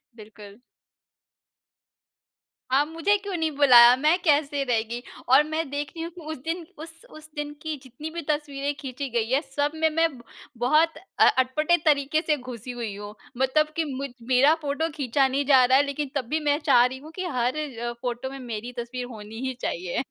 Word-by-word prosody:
बिल्कुल। 210 -1 -13 2.1
हाँ, 275 +3 +4
मुझे 330 +6 +1
क्यों 395 -1 -6
नहीं 320 -1 0
बुलाया? 245 -4 +8
मैं 305 +6 +3
कैसे 290 -3 +2
रह 245 -4 +1
गई? 240 +1 -4 0.3
और 265 +3 +7
मैं 315 0 -3
देख 285 +1 -3
रही 325 - -5
हूँ 335 - -6
कि 355 - -10
उस 315 0 -6
दिन 330 +2 -3
उस 325 +1 -8 0.2
उस 310 -7 -13
दिन 295 0 -4
की 315 0 -3
जितनी 265 +5 -8
भी 340 - -4
तस्वीरें 290 -1 -1
खींची 275 0 -5
गई 230 -2 -1
हैं 270 +2 +3
सब 285 0 -2
में 320 0 +2
मैं 325 +1 +2
ब 235 - -15 0.3
बहुत 305 +7 +2 0.2
अ - - +7
अटपटे 300 +7 +2
तरीके 295 0 +2
से 310 -2 0
घुसी 250 -2 -8
हुई 235 -4 -5
हूँ, 205 +1 -8 0.2
मतलब 265 +4 +2
कि 330 - +1
मुझ 275 +2 -4 0.2
मेरा 260 +4 +5
फोटो 295 +2 -1
खींचा 270 -1 +2
नहीं 275 +2 -1
जा 265 -2 +6
रहा 260 +1 +5
है 280 - +4
लेकिन 280 0 -3
तब 270 -3 -1
भी 310 - 0
मैं 290 - +3
चाह 245 -5 +6
रही 255 +1 -3
हूँ 305 +3 -12
कि 370 - -4
हर 255 -6 -1
अ, 240 -6 -4
फोटो 245 +1 -3
में 270 0 -8
मेरी 240 -1 -6
तस्वीर 245 +1 -5
होनी 215 0 -9
ही 260 - -2
चाहिए। 175 +6 -2
280 Hz, 200 wpm, -25 LUFS, 245-310 Hz, 2.1 s, बुलाया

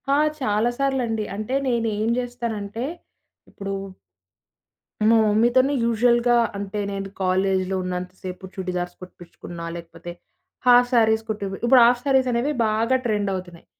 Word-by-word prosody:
ఆ! 280 - +4 0.2
చాలా 215 0 +1
సార్లుండి. 255 -5 0
అంటే 215 +6 -3
నేనేం 225 -3 0
జేస్తానంటే, 235 -3 -4 0.6
ఇప్పుడు 195 0 -6 1.4
మా 230 - +6
మమ్మీతోని 240 +6 +3
యూజువల్‌గా 240 +1 +3 0.2
అంటే, 200 +1 -4
నేను 195 0 -4
కాలేజీలో 190 0 +1
ఉన్నంత 180 0 -4
సేపు 185 0 -7
చుడీదార్స్ 180 -1 -4
కుట్టిపించుకున్న. 175 -1 -11 0.2
లేకపోతే, 170 0 -9 0.5
హాఫ్ 245 0 +6
శారీస్ 220 -2 +3
కుట్టి 210 -2 -3
పి - - -4
ఇప్పుడు 250 +1 +6
హాఫ్ 245 +1 +3
శారీస్ 265 -2 +3
అనేవి 240 +5 0 0.2
బాగా 225 +4 +1
ట్రెండ్ 210 -3 0
అవుతున్నాయి. 180 -2 -7
215 Hz, 125 wpm, -23 LUFS, 190-240 Hz, 1.4 s, మా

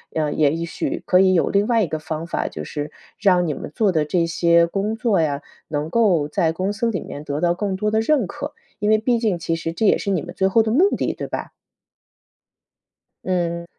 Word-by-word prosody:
嗯， 155 -2 -1
也 150 -2 +3
一 165 +1 -3
许 170 - -4
可 180 - +4
以 190 -1 +5
有 175 - +2
另 200 +1 +2
外 230 -3 +3
一 - - -1
个 155 0 -3
方 155 +1 -5
法， - - -2
就 75 - -6
是 145 - -5 0.3
让 180 -4 +3
你 150 - -1
们 140 - -7
做 210 -4 +3
的 155 -3 +1
这 170 +3 +1
些 170 0 +3
工 200 +5 -2
作 225 -6 +1
呀， 145 -3 0 0.3
能 150 0 -3
够 180 -8 +2
在 160 +1 +1
公 185 +4 -1
司 225 +3 -1
里 190 -7 -2
面 145 - -8
得 145 0 -3
到 175 -1 +3
更 195 +1 -2
多 210 +2 -1
的 220 - +2
认 265 0 +2
可， - - -6 0.3
因 210 - 0
为 215 - +5
毕 235 +1 +1
竟 210 -6 0
其 165 0 -2
实 165 0 -4
这 220 - -1
也 - - +5
是 200 - -3
你 180 - +1
们 175 0 -8
最 190 0 +1
后 225 +4 +4
的 220 - -1
目 360 - +4
的， - - -1
对 - - -6
吧？ - - -5 1.7
嗯。 170 -2 -1
180 Hz, 255 characters per minute, -21 LUFS, 160-210 Hz, 1.7 s, 以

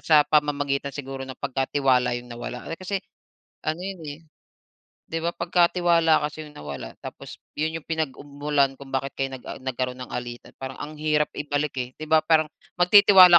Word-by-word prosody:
sa 155 - +5
pamamagitan 145 -2 +1
siguro 135 -1 -5
ng 130 - -7
pagka 135 0 -1
tiwala 125 -3 +3
'yung 120 0 -8
nawala. 120 +1 -6
Eh, 165 - -6
kasi 185 +2 -1 0.7
ano 155 +2 -1
'yun, 190 -1 -5
eh, 145 +2 -6 0.9
'di 165 - -2
ba 170 - +2
pagka 170 0 +3
tiwala 170 -2 +5
kasi 150 +1 -4
'yung 150 - -14
nawala 75 -1 -6
tapos - - -8 0.2
'yun 160 +1 0
'yung 160 - -17
pinag-ug 160 -3 -2
mulan 145 -1 +1
kung 140 -1 -11
bakit 135 +1 -1
kayo 135 0 -1
nag 125 - -16
ah, - - -4
nagkaroon 130 -1 -2
ng - - -9
alitan 120 -1 -5
parang 130 0 -5
ang 150 +1 -6
hirap 150 0 +2
ibalik, 145 0 -1
eh, 125 0 -3
'di 155 - -5
ba 160 - +7
parang 155 -1 +4 0.3
magtitiwala 185 -1 +9
145 Hz, 190 wpm, -25 LUFS, 135-160 Hz, 0.9 s, magtitiwala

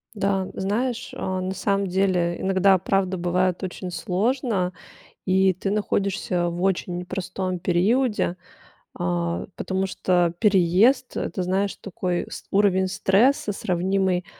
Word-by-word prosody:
Да, 195 -1 0
знаешь, 240 +5 -2
а, 185 0 -3
на 185 +1 -3
самом 200 +1 0
деле 180 -2 +1
иногда 190 0 +4
правда 190 0 0
бывает 180 +1 0
очень 185 0 -5
сложно. 200 0 -1 0.5
И 190 0 +3
ты 195 +2 -3
находишься 200 -3 0
в 170 +1 -5
очень 185 -2 0
непростом 185 0 -4
периоде, 200 +3 +1 0.6
а, 85 0 -1
потому 190 0 -2
что 175 -2 +1
переезд- 210 +6 +3
это, 185 - -2
знаешь, 190 +2 0
такой 180 -2 -3
ст - - -9
уровень 190 -2 +3
стресса, 210 +5 +2
сравнимый 185 0 0
190 Hz, 120 wpm, -24 LUFS, 180-200 Hz, 0.6 s, иногда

